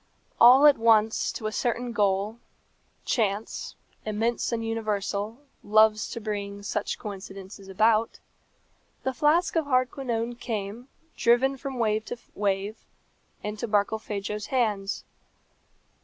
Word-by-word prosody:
All 255 +5 +8
at 290 -4 +7
once 220 -1 +3
to 220 - -6
a 215 - -1
certain 240 +2 -1
goal 205 +1 0 0.7
Chance, 215 -2 -1 0.3
immense 225 +3 -1
and 230 -1 -2
universal, 215 +1 -2 0.2
loves 215 0 +4
to 230 - -5
bring 205 -2 -4
such 205 0 -2
coincidences 195 -1 -9
about 215 +3 +2 0.8
the 265 - -1
flask 305 +8 +2
of 325 -2 +2
Hardquanonne 250 -3 -1
came, 220 +1 -4 0.3
driven 250 +3 +3
from 270 0 -6
wave 215 -2 +1
to 245 - -5 0.2
wave, 200 +1 -2 0.6
into 210 +2 -4
Barkilphedro's 210 0 -1
hands. 210 -6 -1
220 Hz, 110 wpm, -27 LUFS, 205-240 Hz, 0.8 s, All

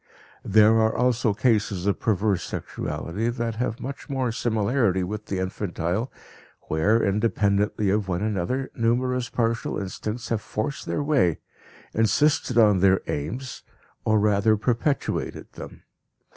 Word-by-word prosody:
There 110 +2 +5
are 110 0 +2
also 125 -1 +2
cases 105 -4 +1
of 100 - +1
perverse 105 -3 +1
sexuality 85 +11 -4
that 115 -2 -3
have 120 -1 -2
much 135 +1 -7
more 130 -3 -1
similarity 110 -3 +1
with 105 +4 -5
the 95 - -2
infantile, 95 +3 -2 0.6
where, 105 +9 +2
independently 100 0 +1
of 105 -1 0
one 90 +1 -1
another, 110 +6 -2
numerous 125 +2 0
partial 115 -1 -1
instincts 105 +4 -5
have 115 -2 0
forced 110 +7 -4
their 145 - -1
way, 135 - +2 0.6
insisted 120 +4 +2
on 105 -4 +5
their 95 0 +4
aims, 120 - -4 0.4
or 110 -1 +3
rather 105 +1 +3
perpetuated 120 +6 -1
them. - - -10
110 Hz, 130 wpm, -25 LUFS, 100-120 Hz, 0.6 s, There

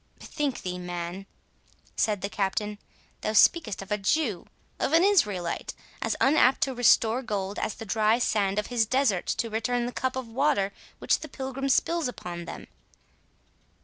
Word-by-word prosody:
"Bethink 290 -5 -3
thee, 180 0 -4
man," 175 +2 -5 0.7
said 210 -3 0
the 200 - -1
Captain, 205 +1 -2 0.4
"thou 215 - -1
speakest 270 - +4
of 195 - -15
a 210 - +1
Jew—of 220 - -2
an 330 +2 +6
Israelite,—as 205 - 0
unapt 270 -1 +4
to 270 - +1
restore 240 0 +4
gold, 200 -4 -3
as - - -2
the 225 - -8
dry 215 +2 +2
sand 205 -5 +1
of 210 - 0
his 225 -2 +2
deserts 250 -7 +1
to 230 -1 -3
return 240 +2 0
the 245 - -3
cup 260 +1 -2
of 260 -2 -4
water 225 -5 +1 0.2
which - - +1
the 310 - -8
pilgrim 270 +1 -4
spills 335 +3 +2
upon 175 -8 -6
them." - - -8
220 Hz, 155 wpm, -27 LUFS, 195-265 Hz, 0.7 s, an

